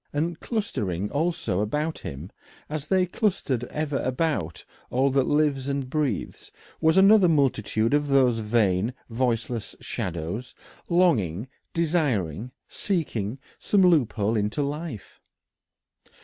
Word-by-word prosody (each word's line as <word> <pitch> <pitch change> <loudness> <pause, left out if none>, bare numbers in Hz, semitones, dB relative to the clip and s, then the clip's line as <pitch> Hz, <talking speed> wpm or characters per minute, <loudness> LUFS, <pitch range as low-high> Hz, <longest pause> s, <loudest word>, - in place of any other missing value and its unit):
And 160 +3 -2
clustering 105 - -2
also 145 - 0
about 150 +9 -1
him, 75 +8 -7 0.4
as 150 -1 -4
they 185 0 +3
clustered 175 - -1
ever 150 +1 -2
about 130 - -1 0.2
all 135 +2 +2
that 135 -1 +2
lives 145 -3 +1
and 140 -2 -2
breathes, 145 - -2 0.3
was 160 +2 +3
another 195 -1 +7
multitude 120 -6 +1
of 145 0 +2
these 130 -4 +3
vain 105 0 +1 0.2
voiceless 115 -1 -1
shadows, 90 +8 -4 0.3
longing, 130 - +2 0.3
desiring, 125 - 0 0.2
seeking 135 - -2 0.2
some 200 -2 +3
loophole 120 - +3
into 105 +6 0
life. 145 - -6
135 Hz, 110 wpm, -25 LUFS, 110-160 Hz, 0.4 s, another